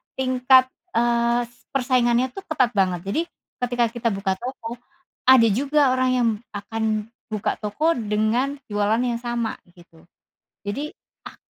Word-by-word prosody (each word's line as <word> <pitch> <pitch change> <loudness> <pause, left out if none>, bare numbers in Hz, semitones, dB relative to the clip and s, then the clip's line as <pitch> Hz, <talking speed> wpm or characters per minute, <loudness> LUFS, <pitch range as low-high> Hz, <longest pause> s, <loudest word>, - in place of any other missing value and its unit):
tingkat, 255 0 +4 0.3
eee, 235 0 +2
s 240 - -27
persaingannya 250 -1 +2
tuh 390 +9 -10
ketat 260 -6 +2
banget. 185 -3 +2
Jadi, 310 +11 +1 0.4
ketika 245 -1 +1
kita 235 -1 -1
buka 195 -1 -1
toko, 240 -1 -6 0.5
ada 255 -3 +7
juga 280 +5 +2
orang 255 0 +2
yang 240 -2 +3 0.2
akan 215 +1 -2 0.2
buka 210 - -1
toko 295 +11 0
dengan 230 +6 0
jualan 210 +3 +1
yang 240 -2 0
sama, 240 -2 -2 0.2
gitu. 170 -2 -19 0.6
Jadi 270 +9 -3 0.4
ah - - -16
240 Hz, 135 wpm, -23 LUFS, 215-255 Hz, 0.6 s, ada